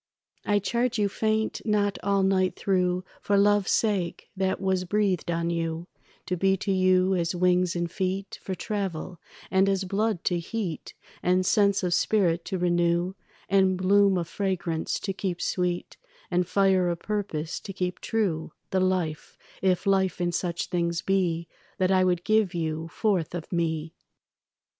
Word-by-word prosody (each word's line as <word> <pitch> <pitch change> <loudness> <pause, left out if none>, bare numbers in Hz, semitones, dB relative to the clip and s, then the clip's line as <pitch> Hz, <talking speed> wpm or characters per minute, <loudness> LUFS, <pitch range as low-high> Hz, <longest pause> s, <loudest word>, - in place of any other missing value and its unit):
I 205 -1 +3
charge 235 +5 0
you 205 -1 +2
faint 220 +2 -1
not 205 -2 +1
all 200 0 +2
night 190 -1 +2
through 180 -2 +1 0.2
For 200 - +2
love's 205 0 +3
sake 195 -6 0
that 190 0 0
was 190 -1 0
breathed 190 -2 0
on 170 0 0
you 165 0 -2 0.4
To 180 - -1
be 190 +2 +2
to 195 +1 -2
you 185 0 +3
as 170 -1 0
wings 180 0 +2
and 170 -1 -2
feet 190 +2 -3
For 190 - -4
travel, 185 -3 -4 0.3
and 190 +1 +4
as 195 -1 +1
blood 200 0 -1
to 175 -1 +1
heat 180 -2 -5 0.3
And 185 +1 +2
sense 200 0 +3
of 180 -1 +1
spirit 175 -3 +2
to 190 - -2
renew 175 0 +1 0.3
And 190 -1 +3
bloom 195 +1 +4
of 170 -2 -2
fragrance 175 -4 -2
to 195 - -2
keep 185 -2 -3
sweet 180 -1 -2 0.3
And 175 0 +1
fire 190 -2 +3
of 170 - -1
purpose 190 -7 -3
to 195 - -8
keep 180 -1 -3
true 185 -9 -1 0.2
The 190 - +2
life, 185 -5 -1 0.2
if 185 -2 +1
life 190 -2 +2
in 175 0 0
such 170 0 -2
things 170 -1 -1
be, 175 -4 0 0.3
That 185 0 +2
I 185 -1 +4
would 175 -1 +1
give 215 -4 +2
you 160 -1 -2
forth 180 -3 -1
of 170 - -6
me. 160 -2 -1
185 Hz, 160 wpm, -26 LUFS, 175-195 Hz, 0.4 s, and